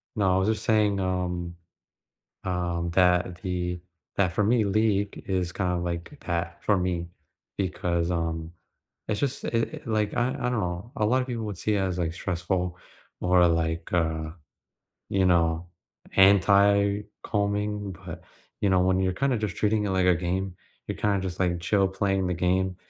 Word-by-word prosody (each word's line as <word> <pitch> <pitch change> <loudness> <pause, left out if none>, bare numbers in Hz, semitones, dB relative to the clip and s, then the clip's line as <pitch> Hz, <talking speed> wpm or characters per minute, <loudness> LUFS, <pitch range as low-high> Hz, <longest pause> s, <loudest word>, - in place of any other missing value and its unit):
No, 95 -3 +2
I - - +3
was 95 - +1
just 110 0 -1
saying, 105 -3 +2
um, 90 -2 -2 0.9
um, 85 -2 -1
that 90 -1 +3
the 90 -2 -2 0.4
that 95 -4 +2
for 105 - +1
me, 110 +1 +3
League 100 0 +1
is 90 -2 -1
kinda 90 -2 -1
like 85 - -3
a - - -12
path 85 - -3
for 105 -3 +3
me, 90 -2 -1 0.5
because, 90 -3 -1
um, 80 -1 -2 0.6
it's 105 -1 -1
just 140 -1 -2
i - - -2
it, 115 -1 -2
like 110 -2 0
I 120 +1 +2
I - - -2 0.2
don't - - -2
know. 90 +6 -4
A 105 - +1
lotta 130 +3 +2
people 120 -3 -4
would 105 -4 -4
see 105 +3 0
it 100 - +1
as, 90 -2 -1
like, 80 -2 -1
stressful 90 0 -2 0.5
or, 90 -1 +5
like, 80 0 -1
uh, 80 -2 0 0.8
you 95 -1 +2
know, 85 -1 +2 0.5
anti-calming, 100 +1 +3
but, 85 -2 -9 0.4
you 100 - +3
know, 95 -1 +4
when 95 0 +2
you're 95 -1 +1
kinda 135 +2 +1
just 105 -4 -3
treating 105 0 +1
it - - -1
like 95 -1 +2
a 90 -1 +5
game, 90 +1 -2 0.3
you're - - -4
kinda 100 -2 +1
just, 95 -1 -5
like, 90 -2 +1
chill 95 +2 +2
playing 95 -1 0
the 90 - 0
game, 95 +1 +1
95 Hz, 175 wpm, -26 LUFS, 90-100 Hz, 0.9 s, or